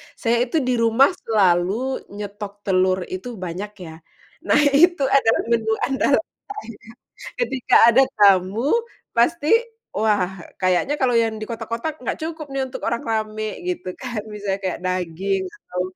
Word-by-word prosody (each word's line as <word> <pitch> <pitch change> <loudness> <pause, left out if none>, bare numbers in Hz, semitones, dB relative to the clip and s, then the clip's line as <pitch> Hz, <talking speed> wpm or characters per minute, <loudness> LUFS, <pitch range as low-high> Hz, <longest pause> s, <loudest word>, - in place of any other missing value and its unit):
Saya 235 -1 +1
itu 290 +6 -2
di 255 0 0
rumah 230 +6 +4
selalu 205 +5 +1
nyetok 205 0 -7
telur 185 -1 +2
itu 230 +6 -5
banyak 185 +2 -5 0.2
ya. 160 - -10 0.5
Nah - - +4
itu, 335 +1 +4
adalah 265 -4 +3
menu 225 -1 +1 0.2
andalan 270 +3 +2 1.2
ketika 270 - +1 0.2
ada 265 - +6 0.2
tamu 200 +6 +4 0.5
pasti, 300 +6 +2 0.4
wah 195 -4 0 0.2
kayaknya 185 +9 +1
kalau 255 -2 +2
yang 225 -1 +1
di - - -3
kotak-kotak 230 +7 -4
nggak 245 - -2
cukup 315 -2 -5
nih 270 -1 -1
untuk - - -8
orang 235 - -2
ramai, 215 - -3
gitu 350 - -4
kan. 245 -4 -5
Misalnya 200 -2 -3
kayak 185 - -2
daging, 185 +2 -1
atau 180 0 -5
220 Hz, 140 wpm, -22 LUFS, 190-260 Hz, 1.2 s, ada